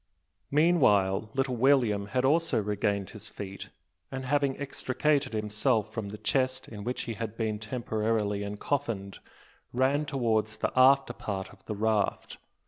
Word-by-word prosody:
Meanwhile 110 Hz, -, +3 dB
little 135 Hz, -1 st, 0 dB
William 115 Hz, -6 st, +3 dB
had 130 Hz, +3 st, 0 dB
also 165 Hz, -1 st, +3 dB
regained 100 Hz, -1 st, -1 dB
his 105 Hz, +1 st, -9 dB
feet; 100 Hz, -1 st, -8 dB, 0.4 s
and, 130 Hz, 0 st, -4 dB
having 140 Hz, 0 st, +1 dB
extricated 140 Hz, 0 st, 0 dB
himself 105 Hz, +1 st, 0 dB
from 110 Hz, -3 st, -4 dB
the 105 Hz, -, -7 dB
chest 130 Hz, +2 st, 0 dB
in 105 Hz, -2 st, -8 dB
which 125 Hz, +3 st, -2 dB
he 115 Hz, -, -4 dB
had 110 Hz, 0 st, -5 dB
been 110 Hz, -2 st, -1 dB
temporarily 110 Hz, -2 st, -1 dB
encoffined, 105 Hz, -1 st, -3 dB, 0.5 s
ran 135 Hz, +4 st, +2 dB
towards 110 Hz, -6 st, 0 dB
the -, -, -1 dB
after 135 Hz, 0 st, +5 dB
part 95 Hz, -5 st, -5 dB
of 95 Hz, -2 st, -20 dB
the 105 Hz, -, -4 dB
raft. 110 Hz, -1 st, 0 dB
110 Hz, 140 wpm, -29 LUFS, 105-135 Hz, 0.5 s, after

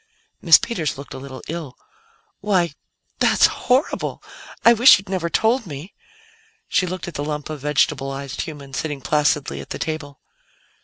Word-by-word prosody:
Miss -, -, +8 dB
Peters 165 Hz, -, -3 dB
looked 140 Hz, -, -9 dB
a -, -, -7 dB
little 130 Hz, -1 st, -9 dB
ill. 160 Hz, -5 st, -6 dB, 0.6 s
"Why 180 Hz, -6 st, +1 dB, 0.5 s
that's -, -, +5 dB
horrible! 260 Hz, +4 st, 0 dB, 0.4 s
I 235 Hz, -, +9 dB
wish 235 Hz, -1 st, +8 dB
you'd 195 Hz, 0 st, -11 dB
never 180 Hz, -3 st, -1 dB
told 225 Hz, -, +1 dB
me." 150 Hz, +5 st, -8 dB, 0.7 s
She 185 Hz, -, +1 dB
looked 180 Hz, 0 st, -5 dB
at 175 Hz, -, -6 dB
the 145 Hz, -, -3 dB
lump 150 Hz, 0 st, -4 dB
of 150 Hz, -3 st, -6 dB
vegetablized 135 Hz, -1 st, -1 dB
human 140 Hz, -4 st, -8 dB
sitting 145 Hz, 0 st, -3 dB
placidly 150 Hz, +1 st, 0 dB
at -, -, -12 dB
the -, -, -4 dB
table. 155 Hz, -3 st, -5 dB
155 Hz, 155 wpm, -21 LUFS, 140-185 Hz, 0.7 s, I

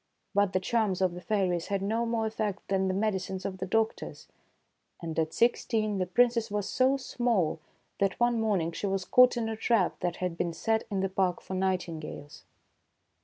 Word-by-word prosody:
But 200 Hz, -1 st, +2 dB
the 185 Hz, -, +2 dB
charms 205 Hz, -1 st, 0 dB
of 185 Hz, -2 st, +1 dB
the 180 Hz, -, -8 dB
fairies 185 Hz, -5 st, 0 dB
had 200 Hz, -1 st, -1 dB
no 225 Hz, +3 st, 0 dB
more 230 Hz, -1 st, 0 dB
effect 215 Hz, -3 st, -3 dB
than 190 Hz, -1 st, +1 dB
the 185 Hz, -, 0 dB
medicines 190 Hz, -2 st, -2 dB
of 190 Hz, -1 st, -4 dB
the 185 Hz, -, -3 dB
doctors; 225 Hz, +3 st, -1 dB, 0.7 s
and 165 Hz, -2 st, -4 dB
at 160 Hz, 0 st, 0 dB
sixteen 220 Hz, -2 st, +1 dB
the 185 Hz, -, 0 dB
Princess 235 Hz, +2 st, +2 dB
was 205 Hz, -1 st, -2 dB
so 260 Hz, +2 st, +2 dB
small 235 Hz, -, 0 dB, 0.4 s
that 195 Hz, -1 st, 0 dB
one 240 Hz, -1 st, +2 dB
morning 190 Hz, -7 st, +1 dB
she 170 Hz, +5 st, -3 dB
was 195 Hz, -1 st, -1 dB
caught 250 Hz, +4 st, +5 dB
in 230 Hz, -2 st, -1 dB
a 225 Hz, -, -2 dB
trap 220 Hz, -4 st, +1 dB
that 175 Hz, -1 st, -1 dB
had 180 Hz, -2 st, -4 dB
been 170 Hz, -, -1 dB
set 220 Hz, +5 st, 0 dB
in 195 Hz, -2 st, -1 dB
the 195 Hz, -, 0 dB
park 185 Hz, -2 st, 0 dB
for -, -, -8 dB
nightingales. 175 Hz, -6 st, -3 dB
195 Hz, 190 wpm, -29 LUFS, 185-225 Hz, 0.7 s, caught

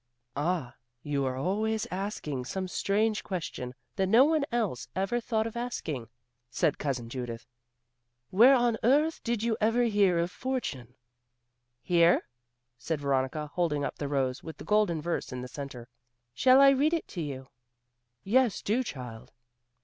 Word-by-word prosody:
"Ah, 150 Hz, -3 st, -1 dB, 0.3 s
you 140 Hz, -2 st, -1 dB
are 130 Hz, -1 st, -1 dB
always 215 Hz, +9 st, 0 dB
asking 180 Hz, -8 st, -3 dB
some 185 Hz, +9 st, -4 dB
strange 210 Hz, +4 st, 0 dB
question 130 Hz, -9 st, -5 dB, 0.2 s
that 190 Hz, -1 st, +2 dB
no 230 Hz, +7 st, +6 dB
one 310 Hz, -1 st, +2 dB
else 210 Hz, -, -1 dB
ever 195 Hz, +6 st, 0 dB
thought 220 Hz, -2 st, -1 dB
of 225 Hz, -, -5 dB
asking;" 160 Hz, -, -4 dB, 0.4 s
said 140 Hz, +4 st, 0 dB
Cousin 130 Hz, -5 st, -2 dB
Judith, 120 Hz, -1 st, -6 dB, 0.9 s
"where 240 Hz, +8 st, +7 dB
on 240 Hz, -2 st, +2 dB
earth 295 Hz, +7 st, +3 dB
did 230 Hz, -2 st, -1 dB
you 230 Hz, -1 st, +1 dB
ever 225 Hz, +3 st, +3 dB
hear 205 Hz, -6 st, +3 dB
of 170 Hz, +1 st, 0 dB
fortune?" 140 Hz, -, -4 dB, 0.9 s
"Here," 170 Hz, -1 st, +4 dB, 0.6 s
said 155 Hz, +5 st, -2 dB
Veronica, 140 Hz, +2 st, -1 dB
holding 155 Hz, -5 st, 0 dB
up -, -, -5 dB
the 145 Hz, -, -2 dB
rose 135 Hz, -2 st, -1 dB
with 160 Hz, -, -9 dB
the -, -, -9 dB
golden 205 Hz, -7 st, +2 dB
verse 170 Hz, -3 st, -2 dB
in 125 Hz, 0 st, -5 dB
the -, -, -6 dB
centre. 130 Hz, -3 st, -8 dB, 0.5 s
"Shall 255 Hz, -, +5 dB
I 275 Hz, -, +9 dB
read 295 Hz, +5 st, +3 dB
it 330 Hz, -, -4 dB
to 175 Hz, -, -5 dB
you?" 135 Hz, -3 st, -6 dB, 0.7 s
"Yes, 240 Hz, 0 st, +2 dB
do, 225 Hz, +5 st, +1 dB
child." 125 Hz, -, -7 dB
180 Hz, 155 wpm, -29 LUFS, 135-225 Hz, 0.9 s, I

